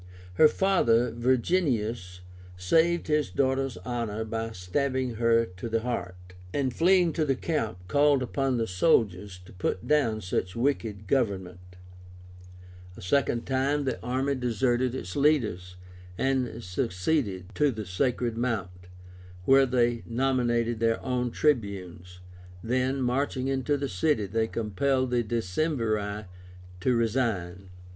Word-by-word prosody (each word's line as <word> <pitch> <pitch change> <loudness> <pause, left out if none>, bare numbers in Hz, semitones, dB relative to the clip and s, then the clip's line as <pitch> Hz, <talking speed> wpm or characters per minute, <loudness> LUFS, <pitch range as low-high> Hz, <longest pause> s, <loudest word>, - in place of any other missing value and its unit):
Her 155 - +7
father, 125 -12 +2
Virginius, 120 - 0 0.4
saved 165 - +2
his 150 -1 +1
daughter's 135 -1 0
honor 115 -3 -3
by 115 +1 -3
stabbing 130 +7 -2
her 115 0 +3
to 90 +4 -8
the 115 0 0
heart, 90 -7 -5 0.2
and 130 0 -1
fleeing 175 +1 +3
to 160 - 0
the 135 -3 +1
camp 110 - -3
called 145 +3 +3
upon 135 +1 -1
the 115 - 0
soldiers 95 - +1
to - - -14
put 90 0 -3
down 140 -8 +2
such 90 0 -2
wicked 115 -5 -1
government. 95 -6 -2 1.2
A - - -10
second 120 +3 +1
time 140 +2 0
the 130 -3 -3
army 130 +3 -1
deserted 125 0 0
its 90 -7 -6
leaders, 110 - +1 0.4
and 130 -2 -1
seceded 95 - -2
to 150 -1 +2
the 110 -5 -4
SACRED 120 +5 -1
MOUNT, 95 -7 -3 0.6
where 135 0 +5
they 120 -2 +1
nominated 120 -2 0
their 115 0 +1
own 125 -1 0
Tribunes. 95 - -2 0.4
Then, 130 +3 0
marching 130 +1 -1
into 135 +2 0
the 140 0 -2
city, 120 - 0
they 110 +3 0
compelled 130 +5 -1
the 120 -1 +2
Decemviri 110 - -1 0.5
to 125 +7 +1
resign. 105 -6 -1
120 Hz, 125 wpm, -27 LUFS, 100-135 Hz, 1.2 s, Her